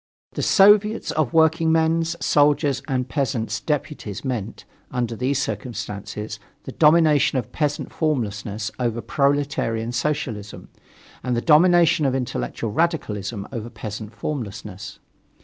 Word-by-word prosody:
The - - -4
Soviets 210 +2 +4
of 155 -6 0
Workingmen's, 160 +1 +3
Soldiers' 145 -2 +3
and 130 -1 -1
Peasants' 120 -6 -1
Deputies 145 - -4
meant, 115 -5 -4 0.2
under 120 -2 -2
these 130 +4 0
circumstances, 105 -2 -5 0.2
the - - -7
domination 155 -3 +4
of 120 -4 -3
peasant 150 -2 -2
formlessness 110 -8 -2
over 120 -2 -1
proletarian 135 -3 0
socialism, 120 -6 -3 0.5
and 125 -1 -1
the - - +3
domination 165 +1 +5
of 130 - 0
intellectual 115 - -3
radicalism 105 - -1
over 115 -2 -5
peasant 110 -1 -7
formlessness. 105 -7 -6
130 Hz, 115 wpm, -23 LUFS, 110-150 Hz, 0.5 s, domination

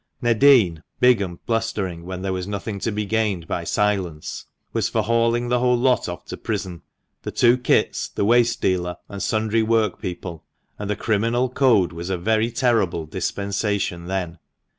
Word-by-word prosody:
Nadin, 120 - +4 0.2
big 125 -3 +5
and 90 -3 -6
blustering 105 -7 -2
when 95 0 -5
there 95 -1 -1
was 90 0 -4
nothing 100 0 -4
to 115 - -1
be 105 0 -2
gained 105 -5 0
by 85 - -2
silence, 95 -5 -1 0.3
was - - 0
for - - 0
hauling 115 +1 +1
the 125 0 +2
whole 125 0 +3
lot 125 -5 +2
off 85 - -7
to - - -7
prison 90 -3 -4 0.2
— - - -52
the - - -5
two 120 0 +4
Kits, 125 - +1
the - - -2
waste 120 +1 +3
dealer, 90 -2 0
and 100 -1 -6
sundry 110 +1 +1
workpeople 100 -6 -1 0.2
— - - -41
and 105 -1 -4
the 105 - 0
criminal 115 +5 0
code 115 - +3
was 85 +2 -6
a 95 - 0
very 110 +5 +1
terrible 115 -9 +1
dispensation 100 0 -2
then. 90 -3 -3
105 Hz, 175 wpm, -22 LUFS, 90-115 Hz, 0.3 s, big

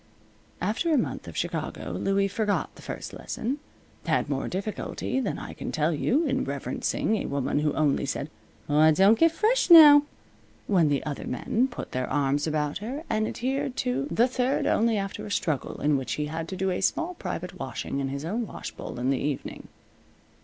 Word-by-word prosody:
After 220 - 0
a 305 - +4
month 240 - -2
of - - -8
Chicago - - -3
Louie 195 0 +1
forgot 205 +1 -1
the - - -15
first - - -6
lesson; 265 +6 -4 0.5
had 145 - +1
more 135 -1 -1
difficulty 205 +6 -3
than 235 -7 -2
I - - -7
can - - -6
tell 155 +2 +1
you 275 - +1
in 265 -2 0
reverencing 220 - -1
a - - -3
woman 140 0 0
who 150 0 +1
only 145 -2 +1
said, 140 +3 -3 0.4
"Aw, 150 +2 +5
don't 195 +8 +5
get 330 0 +5
fresh 435 +8 +1
now!" 300 -4 +10 0.6
when 175 -7 +3
the 140 -1 0
other 150 -2 -4
men 225 - 0
put 245 - -7
their 130 0 -2
arms 145 +2 +1
about 150 0 -1
her; 255 +9 -5
and 215 0 +1
adhered 265 +1 -2
to 250 +3 0
the 240 -1 +3
third 255 +1 0
only 225 0 +2
after 195 +1 -4
a - - -7
struggle, 155 -7 -1
in 145 0 +2
which 130 - -3
he 150 - -2
had 160 +2 -4
to 190 - -5
do 190 0 0
a 180 - -2
small 330 - 0
private 180 - -6
washing 135 +1 -4
in 135 - -1
his 140 +2 -4
own 220 +6 -2
wash - - -7
bowl - - -8
in 125 +2 +1
the 135 - 0
evening. 145 -2 -4
190 Hz, 195 wpm, -26 LUFS, 150-245 Hz, 0.6 s, now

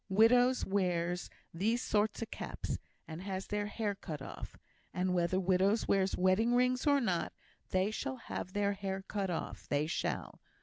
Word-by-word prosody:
Widows 245 +5 +5
wears 180 -3 0 0.2
these 215 +8 +1
sort 210 -3 +1
o' - - -2
caps, - - -4 0.3
and 160 +2 -6
has 190 0 -3
their 205 0 -2
hair 210 0 -1
cut 160 -6 -6
off; 135 - -8 0.4
and 185 0 +1
whether 175 +1 +2
widows 190 +4 +2
wears 195 -1 +2
wedding 185 +6 +3
rings 250 +2 +2
or 285 -1 +5
not, 185 -9 0 0.4
they 190 +3 +2
shall 130 -11 -3
have 180 +7 -6
their 205 0 +1
hair 195 -1 -3
cut 200 -2 -1
off 170 - -4
they 145 +1 +2
shall. 160 - -3
195 Hz, 165 wpm, -33 LUFS, 180-215 Hz, 0.4 s, Widows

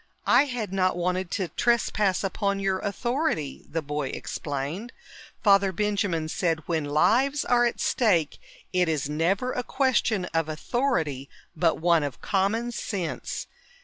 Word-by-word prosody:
"I 250 +4 +5
had 240 -8 -4
not 185 -2 +1
wanted 180 +1 -1
to 190 -4 -1
trespass 215 -5 +1
upon 200 0 -1
your 195 -1 0
authority," 220 - -2
the 165 0 -2
boy 145 -1 -2
explained. 145 - -4 0.5
Father 200 -2 +5
Benjamin 200 -4 0
said, 160 -1 -1
"When 160 -3 0
lives 255 - +2
are 240 0 +4
at 235 - -4
stake, 175 - +1 0.3
it 180 -2 +2
is 150 -4 0
never 175 +11 0
a 250 - -2
question 245 -7 +1
of 165 -1 0
authority 155 - -1 0.3
but 165 -1 +2
one 170 0 +4
of 140 -5 -4
common 215 +5 0
sense. 200 -9 -4
190 Hz, 140 wpm, -26 LUFS, 160-230 Hz, 0.5 s, I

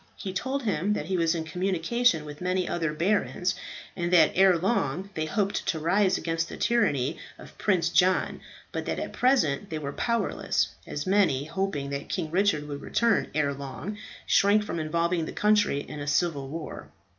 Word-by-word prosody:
He 190 - -6
told 265 +7 -2
him 205 -2 0
that 150 - -3
he 190 +3 -1
was 165 -1 +2
in 165 - -2
communication 180 +2 +1
with 150 0 -9
many 185 0 0
other 165 -3 -1
barons, 180 +2 0 0.4
and 175 -1 -2
that 165 -4 +6
ere 190 -1 +5
long 185 - -1
they 155 0 -2
hoped 200 +4 -1
to 160 - +1
rise 190 +4 +2
against 165 0 -2
the - - -7
tyranny 160 - +1 0.2
of - - -13
Prince 180 -5 +2
John, 185 +2 +2 0.3
but - - -4
that - - -2
at - - -4
present 200 - +2
they 160 - -3
were 140 -2 -5
powerless, 235 +1 0 0.2
as 145 - -4
many, 185 -9 +3
hoping 155 -5 -2
that 140 0 -4
King 165 -5 -3
Richard 175 -5 +1
would 145 -1 -6
return 235 -1 +1
ere 145 -2 +1
long, 140 +9 -6 0.3
shrank 205 +1 +4
from 170 - -4
involving 170 +2 0
the - - -6
country 210 -9 +2
in 150 - -8
a 145 - -5
civil 145 -2 0
war. 160 +1 -7
175 Hz, 180 wpm, -27 LUFS, 155-200 Hz, 0.4 s, that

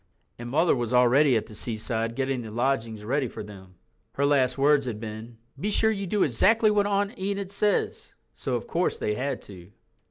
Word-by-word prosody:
And 120 0 -6
Mother 160 +6 +3
was 120 -1 -1
already 125 +2 +5
at 110 - -3
the 110 - -13
seaside 115 +1 -3
getting 135 -1 -1
the 110 - -8
lodgings 115 -2 -1
ready 135 +3 0
for 110 - -8
them. 95 -3 -13 0.4
Her 140 - 0
last 135 -3 +2
words 140 -1 +3
had 110 -3 -4
been— 110 +1 -8 0.2
"Be 205 - -1
sure 220 +1 +3
you 200 -2 -3
do 205 +3 +2
exactly 215 - +3
what 205 -1 +2
Aunt 205 +3 -1
Enid 195 0 -3
says." 205 0 -1 0.2
So, - - -3
of - - -3
course, - - -1
they 105 - -1
had 135 +5 -3
to. 90 -1 -13
130 Hz, 195 wpm, -26 LUFS, 110-185 Hz, 0.4 s, already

